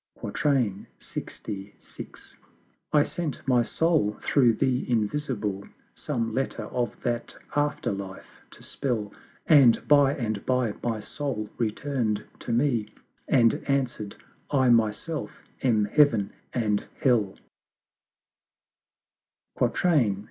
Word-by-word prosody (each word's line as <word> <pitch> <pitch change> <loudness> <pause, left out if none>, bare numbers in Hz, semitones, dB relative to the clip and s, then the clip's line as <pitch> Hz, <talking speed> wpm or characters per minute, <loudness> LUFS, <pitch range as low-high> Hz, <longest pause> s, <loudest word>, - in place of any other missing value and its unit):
LXVI. 105 -5 -3 1.2
I 150 -1 +5
sent 155 -5 -4
my 125 -2 +4
Soul 155 -6 +1
through 125 -5 +4
the 125 +3 0
Invisible, 105 -4 -1 0.3
Some 115 -6 -2
letter 135 +3 -2
of 120 -1 -3
that 120 -1 -2 0.2
After 145 -4 0
life 95 -1 -8
to - - -15
spell: 115 -7 -3 0.3
And 140 -7 +6
by 145 -1 +5
and 110 -5 -3
by 125 -4 +1
my 115 -3 -2
Soul 110 -4 -4
return'd 115 -1 -1 0.2
to - - -5
me, 120 -3 +1 0.4
And 115 -3 +5
answer'd 130 -7 -1 0.3
"I 130 -3 +3
Myself 115 +7 0 0.2
am 110 -5 +3
Heav'n 115 -3 +3 0.2
and 105 -4 0 0.2
Hell:" 110 -7 +2 2.3
LXVII. 135 - +3
120 Hz, 100 wpm, -26 LUFS, 105-140 Hz, 2.3 s, And